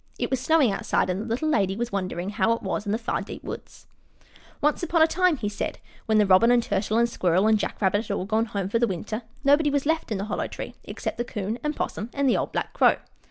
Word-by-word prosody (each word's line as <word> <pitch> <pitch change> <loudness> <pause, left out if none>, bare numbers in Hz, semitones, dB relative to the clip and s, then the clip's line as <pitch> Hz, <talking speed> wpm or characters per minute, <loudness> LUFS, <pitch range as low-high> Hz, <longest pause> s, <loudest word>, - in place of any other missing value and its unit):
IT - - -2
WAS 265 - +1
SNOWING 290 -4 +4
OUTSIDE, 195 -1 0
AND 185 +2 -2
THE - - -5
LITTLE 245 +7 -1
LADY 195 -9 +2
WAS 240 +2 -3
WONDERING 185 -1 -3
HOW 215 +1 +2
IT 230 - -5
WAS 210 - -3
IN - - 0
THE 215 - +1
FAR 230 - -2
DEEP - - -8
WOODS - - -8 0.7
Once 300 +1 +1
upon 345 -2 +3
a - - +8
time, 360 0 +2
he 215 - -3
said, 205 - -3 0.3
when 220 -1 +3
the 210 - +5
Robin, 190 +4 +5
and 245 -1 +4
Turtle, 205 +2 0
and 235 0 +4
Squirrel, 185 -4 +1
and 220 -1 +4
Jack - - -3
Rabbit 205 +2 +1
had 200 - -1
all 185 - -3
gone 220 +3 +1
home 200 -4 -3
for 230 +4 0
the 235 - +3
winter, 215 +4 -4 0.2
nobody 290 +2 +4
was 285 -1 0
left 320 -4 0
in 210 - 0
the 195 - -3
Hollow 210 - -2
Tree - - -7
except - - -5
the - - +1
'Coon 215 0 -4
and 300 0 -1
'Possum 215 +3 -3
and 280 -1 +1
the 250 - +4
old - - -1
black - - -3
Crow. - - +5
220 Hz, 260 wpm, -25 LUFS, 200-265 Hz, 0.7 s, a